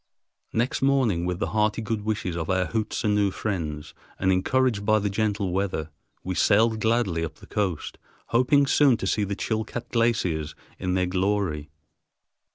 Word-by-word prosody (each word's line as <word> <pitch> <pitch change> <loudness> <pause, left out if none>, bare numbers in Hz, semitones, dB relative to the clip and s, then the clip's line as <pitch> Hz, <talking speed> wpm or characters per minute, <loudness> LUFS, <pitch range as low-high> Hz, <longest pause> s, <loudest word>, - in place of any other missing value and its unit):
Next 120 +3 0
morning, 125 -11 +2
with 90 -1 -1
the - - -2
hearty 105 +1 +1
good 110 0 -2
wishes 105 -5 -2
of 80 -2 -3
our 95 0 +2
Hootsenoo 105 -2 0
friends, 80 -8 -4 0.2
and 95 0 +2
encouraged 110 +3 +1
by 110 +1 +3
the 105 -1 -1
gentle 100 -2 0
weather, 90 -5 -2 0.3
we 95 - -2
sailed 110 +4 +3
gladly 110 -7 +1
up 80 -1 -5
the - - -15
coast, 95 -7 -3 0.3
hoping 130 +4 +4
soon 135 -3 +4
to 100 - -4
see 105 +2 +1
the 100 0 -3
Chilcat 110 +3 -3
glaciers 105 -10 0 0.2
in 90 0 -1
their 90 -1 +2
glory. 90 -5 -1
100 Hz, 160 wpm, -25 LUFS, 90-110 Hz, 0.3 s, hoping